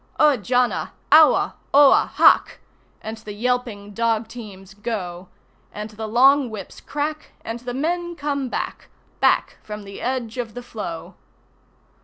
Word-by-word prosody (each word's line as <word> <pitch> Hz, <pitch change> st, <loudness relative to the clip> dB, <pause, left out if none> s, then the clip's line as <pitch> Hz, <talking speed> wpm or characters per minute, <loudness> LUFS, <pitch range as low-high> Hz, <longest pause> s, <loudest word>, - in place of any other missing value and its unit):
Au 300 Hz, -2 st, +6 dB
jana! 245 Hz, +2 st, 0 dB, 0.2 s
Aua! 310 Hz, 0 st, +6 dB, 0.2 s
Oha! 285 Hz, -1 st, +7 dB
Haq! -, -, +5 dB, 0.4 s
And 220 Hz, +1 st, -5 dB
the 215 Hz, -1 st, -9 dB
yelping 225 Hz, -3 st, -2 dB
dog 230 Hz, 0 st, 0 dB
teams 195 Hz, -6 st, -11 dB
go, 190 Hz, -4 st, -5 dB, 0.4 s
And 210 Hz, +1 st, -7 dB
the 220 Hz, +1 st, -6 dB
long 265 Hz, +4 st, +5 dB
whips 210 Hz, -4 st, -8 dB
crack, 300 Hz, +1 st, -4 dB
and 225 Hz, +1 st, -4 dB
the 245 Hz, 0 st, -6 dB
men 345 Hz, +4 st, -2 dB
come 280 Hz, -3 st, -2 dB
back, -, -, -5 dB, 0.3 s
Back -, -, +2 dB
from 210 Hz, -1 st, -8 dB
the 200 Hz, 0 st, -10 dB
edge 250 Hz, -2 st, -3 dB
of 235 Hz, -2 st, -5 dB
the 245 Hz, -, -6 dB
floe! 190 Hz, -8 st, -7 dB
235 Hz, 140 wpm, -22 LUFS, 210-265 Hz, 0.4 s, Oha